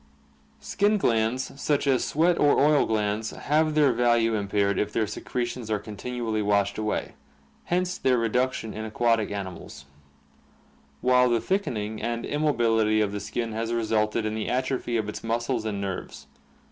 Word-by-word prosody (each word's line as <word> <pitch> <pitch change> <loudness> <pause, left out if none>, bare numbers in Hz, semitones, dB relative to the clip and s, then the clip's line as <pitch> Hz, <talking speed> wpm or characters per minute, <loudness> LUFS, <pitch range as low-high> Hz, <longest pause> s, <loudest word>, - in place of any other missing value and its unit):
Skin 205 +2 +1
glands 125 - 0
such 145 -1 +1
as 135 -2 +2
sweat 170 +3 +2
or 145 - +4
oil 150 0 +4
glands 110 0 -1
have 155 +1 0
their 145 -4 +4
value 120 -1 +2
impaired 100 -1 0
if 105 - -1
their 110 0 +1
secretions 120 +2 -4
are 110 - +1
continually 110 +2 -4
washed 100 0 +1
away, 110 -1 -2 0.5
hence 180 +1 -1
their 130 -1 +2
reduc 125 +3 +1
tion 110 -3 -6
in 110 - -5
aquatic 110 0 +1
animals; 95 -7 -7 1.2
while 125 0 +4
the 120 -1 +2
thickening 110 - -2
and 120 0 -2
immobility 115 -7 +2
of 105 -2 +1
the 105 - -4
skin 110 +3 -3
has 115 +1 -3
resulted 110 -1 0
in 110 - -1
the 110 -1 -3
atrophy 125 -1 -1
of 110 -2 -2
its 105 - -6
muscles 115 +1 -1
and 105 -2 -2
nerves. 95 -2 -5
115 Hz, 160 wpm, -26 LUFS, 105-125 Hz, 1.2 s, or